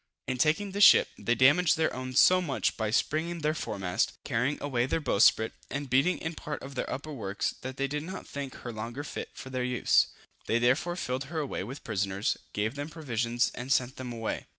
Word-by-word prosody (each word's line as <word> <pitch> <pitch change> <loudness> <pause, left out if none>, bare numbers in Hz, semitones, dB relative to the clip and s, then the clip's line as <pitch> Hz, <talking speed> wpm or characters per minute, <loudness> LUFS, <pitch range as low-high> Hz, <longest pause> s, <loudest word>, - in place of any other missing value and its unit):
In 130 0 -3
taking 160 +8 +2
this 200 +1 +2
ship, - - +8
they 120 - +1
damaged 145 +8 +5
their 160 - +1
own 130 0 -5
so 185 +7 +6
much, 145 -7 -1
by 110 -2 -1
springing 160 +8 0
their 155 +1 +1
foremast, 95 - -1
carrying 125 +6 0
away 125 -4 0
their 165 - 0
bowsprit, 110 -5 +3 0.2
and 140 -2 -4
beating 140 +8 +3
in 160 0 -4
part 150 -2 -6
of 135 +1 -8
their 130 - -3
upper 150 +3 -5
works 105 -6 -2
that 130 +1 -6
they 135 - 0
did 150 +2 -3
not 185 +5 -7
think 140 -2 -6
her 120 - -7
longer 115 +6 -5
fit - - -6
for 130 - -9
their 130 -1 -1
use. 125 -1 +3 0.4
They 115 - +2
therefore 130 +9 +2
filled 130 -6 -3
her 160 +4 -6
away 145 -10 -2
with 130 +8 -8
prisoners, 100 +1 -1 0.2
gave 110 +3 -1
them 145 +2 -5
provision 120 -7 -3
and 125 +2 -6
sent 130 -1 +1
them 130 -1 -5
away. 115 -1 -4
130 Hz, 210 wpm, -29 LUFS, 120-150 Hz, 0.4 s, ship